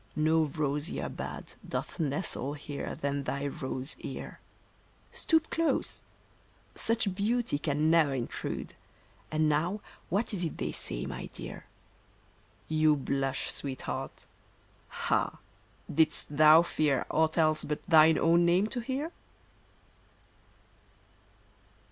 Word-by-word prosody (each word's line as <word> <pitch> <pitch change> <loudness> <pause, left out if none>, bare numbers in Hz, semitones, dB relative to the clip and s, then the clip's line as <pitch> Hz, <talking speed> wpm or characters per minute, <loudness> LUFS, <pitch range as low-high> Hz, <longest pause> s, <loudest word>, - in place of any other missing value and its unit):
No 160 +1 +3
rosier 150 +2 -2
bud - - -7
Doth - - -4
nestle 145 -2 -1
here 145 -1 -5
than 140 0 -2
thy 140 +1 -2
rose 130 0 -4
ear. - - -7 0.7
Stoop 320 -1 +2
close! 330 -1 0 0.7
Such 225 -4 +1
beauty 215 -3 0
can 150 +1 +1
ne'er 155 -5 +4
intrude. 120 -2 -4 0.6
And 155 0 +2
now 165 +7 +1 0.3
what 205 +5 0
is 185 -3 -2
it 165 - -3
they - - -2
say, - - -3
my - - -5
dear? - - -9 1.0
You 155 -1 +4
blush, 135 -1 -1
Sweet 135 -2 -5
heart. - - -5 0.9
Ah! - - +1 0.5
did'st 155 -1 +1
thou 155 +2 +8
fear 150 -5 +1
Aught 160 +1 +2
else 155 -1 +3
but 150 +4 -4
thine 160 -2 +7
own 170 +1 +4
name 175 +3 +4
to 245 - -3
hear 270 +7 -3
155 Hz, 115 wpm, -30 LUFS, 145-175 Hz, 1.0 s, thou